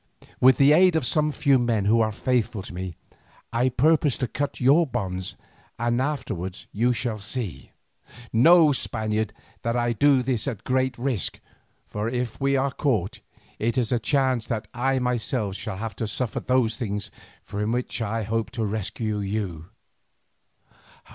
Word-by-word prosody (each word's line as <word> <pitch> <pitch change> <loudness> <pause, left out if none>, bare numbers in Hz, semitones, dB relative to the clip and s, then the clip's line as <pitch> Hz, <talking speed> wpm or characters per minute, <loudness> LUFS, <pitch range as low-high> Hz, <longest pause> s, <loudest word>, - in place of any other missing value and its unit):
With 130 +1 +6
the 140 +1 +6
aid 180 +1 +5
of 160 -5 +1
some 150 +4 +1
few 140 -2 +3
men 115 -4 +1
who 115 +3 +4
are 110 -1 +1
faithful 110 -2 -1
to - - -9
me, 90 -1 -5 0.6
I 120 +2 +2
purpose 145 +2 +3
to 125 - -1
cut 145 +6 -3
your 145 +6 +4
bonds, 95 -7 -3 0.4
and 120 +1 0
afterwards 110 - -3
you 120 +4 +2
shall 115 -2 -2
see. 100 - -4 0.6
Know, 160 +6 +7
Spaniard, 110 -4 -1 0.3
that 115 +1 -1
I 120 0 +1
do 140 +1 +4
this 125 -2 0
at 120 -7 -4
great 130 0 0
risk, 120 - -2 0.5
for 105 +2 -3
if 125 -1 -3
we 140 0 +2
are 135 +1 +1
caught, 120 - -1 0.4
it 115 +4 0
is 120 -3 +1
a 120 - +2
chance 130 -1 +1
but 110 -2 -2
that 105 - -26
I 130 +2 +1
myself 125 -4 -1
shall 105 -1 -5
have 110 +2 -5
to 110 - -2
suffer 115 +2 -2
those 125 -3 +1
things 105 -3 -3 0.3
from 105 +2 -3
which 125 0 -2
I 110 +1 -1
hope 110 +1 -1
to 115 - 0
rescue 105 +1 -2
you." 100 -5 -3
120 Hz, 165 wpm, -25 LUFS, 110-130 Hz, 0.6 s, Know